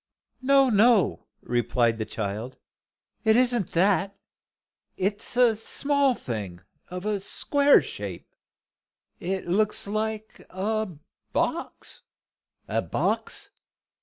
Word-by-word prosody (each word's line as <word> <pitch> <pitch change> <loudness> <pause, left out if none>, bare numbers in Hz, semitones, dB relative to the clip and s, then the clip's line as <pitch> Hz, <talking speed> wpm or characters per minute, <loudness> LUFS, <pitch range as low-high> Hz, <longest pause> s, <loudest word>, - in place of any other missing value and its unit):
"No, 275 0 +4
no," 215 -1 +3 0.2
replied 120 -1 +1
the 110 - -3
child. 110 +4 -4 0.7
"It 220 -1 +4
isn't 245 -5 +1
that. 195 +2 +2 0.8
It's 205 +5 -2
a 240 -3 +5
small 280 +4 +1
thing 100 - -6 0.3
of 180 +2 -6
a 210 -1 0
square 285 +8 +3
shape. - - -7 0.9
It 190 +2 -3
looks 210 +4 0
like 215 +1 -4
a 215 +3 -2 0.4
box." - - -3 0.7
"A - - 0
box? - - -2
205 Hz, 100 wpm, -26 LUFS, 170-230 Hz, 0.9 s, a